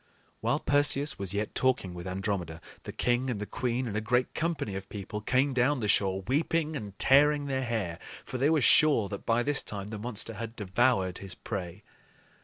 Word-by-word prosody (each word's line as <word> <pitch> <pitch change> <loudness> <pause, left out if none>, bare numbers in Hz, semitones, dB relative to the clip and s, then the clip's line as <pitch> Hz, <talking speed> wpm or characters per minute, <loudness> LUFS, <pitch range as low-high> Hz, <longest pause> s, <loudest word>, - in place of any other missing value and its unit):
While - - 0
Perseus 145 0 +1
was 95 -2 -1
yet 105 +1 -2
talking 130 -8 0
with 90 +1 -7
Andromeda, 95 -3 -3 0.3
the - - -5
king 125 +2 0
and 115 -5 -2
the 105 - -3
queen 125 +3 -2
and 105 - -4
a 110 - 0
great 125 +3 0
company 155 - -2
of 95 0 -7
people 105 +1 -6
came 130 +5 +1
down 130 +3 +2
the 105 - -1
shore, 95 -1 +2
weeping 155 - 0
and 105 -7 -7
tearing 145 +2 +5
their 135 -1 -1
hair; 110 -9 -2 0.3
for 130 - -5
they 140 +4 +3
were 160 -2 +3
sure 140 -6 +5
that 100 - -7
by 115 +1 +2
this 145 +1 +2
time 100 -1 -6
the 105 -1 -6
monster 115 0 -3
had 115 +1 -6
devoured 95 -2 +1
his 95 -2 -6
prey. 95 -1 -6
115 Hz, 200 wpm, -29 LUFS, 100-135 Hz, 0.3 s, tearing